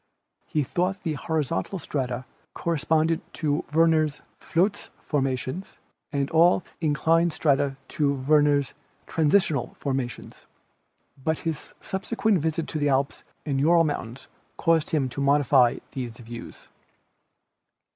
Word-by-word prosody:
He 150 - 0
thought 180 +7 -1
the 160 - -2
horizontal 160 +5 -2
strata 130 -6 -3 0.3
corresponded 160 0 +1
to 150 -2 0
Werner's 155 -2 +3 0.2
"Flotz 195 +5 0
formations" 135 +4 -2 0.4
and 140 -1 0
all 170 +2 +5 0.2
in 155 -3 +1
clined 165 +2 +3
strata 140 -3 +1
to 145 -2 +1
Werner's 145 0 +3 0.3
"Transitional 155 -4 +1
formations." 135 -3 -4 0.8
But 160 +1 +1
his 160 -3 -4
subsequent 210 +1 0
visit 160 +1 -1
to 155 - -3
the 145 0 +2
Alps 135 +1 0 0.2
and 140 -3 0
jura 165 +4 +5
mountains 135 -5 -4 0.3
caused 165 -2 +2
him 145 -4 +1
to 140 - -5
modify 140 -3 +4
these 120 -4 -5
views. 120 -1 -10
150 Hz, 115 wpm, -25 LUFS, 135-165 Hz, 0.8 s, all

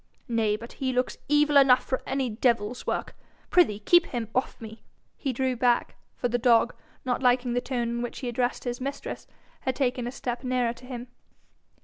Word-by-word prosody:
Nay, 225 -3 +1
but 230 +3 -9
he 260 -1 +1
looks 250 0 -1
evil 295 0 +4
enough 265 -2 +6
for 260 - -1
any 265 -1 0
devil's 235 0 0
work! - - -2 0.4
Prithee 320 - +4
keep 345 +10 +5
him 235 -4 -4
off 255 - -1
me.' 220 0 -10 0.3
He 275 - -2
drew 260 +1 0
back, 240 0 +1 0.2
for 245 - -1
the 245 0 0
dog, 235 0 +4 0.3
not 250 0 0
liking 245 -1 +3
the 245 - +1
tone 245 -2 -2
in 235 0 -2
which 240 - -4
he 255 - -3
addressed 245 +1 -1
his 245 0 -4
mistress, 275 +2 -5 0.3
had 260 - -2
taken 250 -3 0
a - - -3
step 245 -1 -4
nearer 250 -2 0
to 250 +1 -15
him. 245 -1 -6
245 Hz, 195 wpm, -27 LUFS, 235-260 Hz, 0.4 s, enough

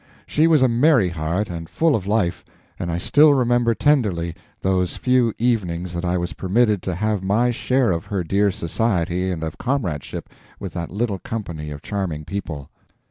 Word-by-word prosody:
She 155 +2 +2
was 155 -5 +5
a - - +6
merry 120 - +4
heart, 85 +5 -2
and 85 -2 -6
full 160 -3 +2
of 95 -3 -3
life, 100 -5 0 0.4
and 85 - -2
I 85 - -1
still 145 - +5
remember 120 -2 +2
tenderly 100 - +1 0.3
those 95 -1 0
few 125 -2 +2
evenings 90 -7 -1
that 85 0 -3
I 90 0 0
was 85 -2 -3
permitted 100 +5 +1
to 90 -1 -3
have 105 +1 -1
my 110 +6 +2
share 125 -1 +1
of 85 -1 -2
her 100 -3 -2
dear 100 +5 +2
society 90 -1 -1
and 85 -3 -3
of 80 -1 -5
comradeship 100 - -2 0.3
with - - -6
that 85 -1 -4
little 100 -1 -2
company 85 -10 -5
of 75 -1 -8
charming 90 -7 -3
people. 80 -8 -6
95 Hz, 180 wpm, -22 LUFS, 85-120 Hz, 0.4 s, a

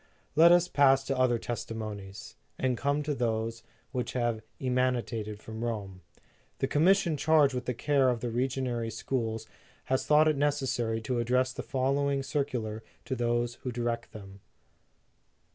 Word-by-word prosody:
Let 165 +3 +8
us 175 0 +5
pass 135 -4 +4
to 135 - -2
other 130 -2 +3
testimonies, 110 -3 -6 0.2
and 130 -1 +1
come 140 +4 0
to 150 0 -1
those 115 -2 -1 0.3
which 125 -2 -3
have 120 -3 0 0.2
emanated 125 -4 -1
from 110 +1 -7
Rome. 100 -5 -4 0.6
The - - 0
Commission 170 +1 +3
charged 150 -2 +4
with 125 -1 -3
the 125 - -2
care 135 0 +2
of 120 -2 0
the 120 - -3
regionary 125 -2 -1
schools 115 -4 -3 0.4
has 130 0 -1
thought 155 +1 +5
it 155 -3 +2
neces 145 -2 +1
sary 115 -2 -1
to 120 +2 -1
address 125 +2 +1
the - - -5
following 135 +2 0
circular 125 -6 -2 0.2
to 130 - -2
those 120 0 -1
who 125 - -3
direct 120 -1 -3
them. 100 -2 -11
125 Hz, 155 wpm, -29 LUFS, 115-135 Hz, 0.6 s, Let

